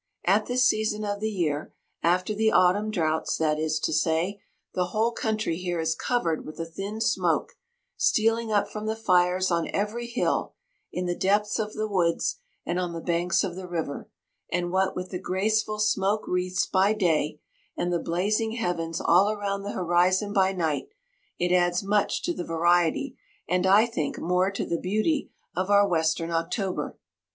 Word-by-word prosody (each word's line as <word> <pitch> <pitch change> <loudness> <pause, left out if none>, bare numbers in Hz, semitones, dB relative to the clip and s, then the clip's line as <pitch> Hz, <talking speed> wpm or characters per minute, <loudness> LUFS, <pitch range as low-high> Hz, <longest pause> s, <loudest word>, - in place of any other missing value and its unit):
At 205 +4 +3
this 250 +1 +2
season 215 -1 0
of 205 0 -2
the 220 +1 -1
year—after 175 +2 -2
the 220 +1 +2
autumn 195 +4 +3
droughts, 160 -6 0
that 155 -1 +1
is 155 0 0
to - - 0
say—the 170 +3 -1
whole 220 +5 0
country 215 -7 -1
here 175 -1 -3
is 160 0 +1
covered 170 -5 -1
with 155 - -10
a 165 - -2
thin 195 +6 -6
smoke, 225 +1 +1 0.5
stealing 225 +1 +2
up 205 -1 +2
from 215 0 -6
the 220 - 0
fires 185 -3 +2
on 170 -1 0
every 215 +4 -2
hill, 235 - -1 0.4
in 180 - -3
the 175 - 0
depths 205 +4 +1
of 215 -1 -2
the 215 0 -1
woods, 175 -5 0 0.3
and 175 +1 -1
on 175 -2 -2
the 165 - -4
banks 170 +1 +1
of 185 -3 -3
the 185 0 -7
river; 160 -5 -4 0.4
and 175 0 -1
what 190 +1 +1
with 180 0 -5
the 180 - -3
graceful 215 +3 0
smoke 210 -1 +1
wreaths 180 0 0
by 195 +2 +3
day, 160 -7 0 0.4
and 175 0 -1
the 170 - +1
blazing 210 +7 0
heavens 175 -7 -2
all 185 +4 +4
around 200 -2 -2
the 200 +1 -5
horizon 185 +3 +2
by 190 -2 +3
night, 165 - -1 0.5
it 180 +1 +1
adds 175 +1 +2
much 205 +1 +1
to 175 - 0
the 175 - -4
variety, 175 - +1 0.3
and 180 +2 +1
I 205 +4 +6
think, 165 -11 -3
more 180 +2 +1
to 200 - -3
the 170 - -2
beauty 215 - 0 0.3
of 185 +2 -1
our 205 0 +5
western 165 -1 0
October. 180 +4 -2
185 Hz, 175 wpm, -26 LUFS, 175-210 Hz, 0.5 s, I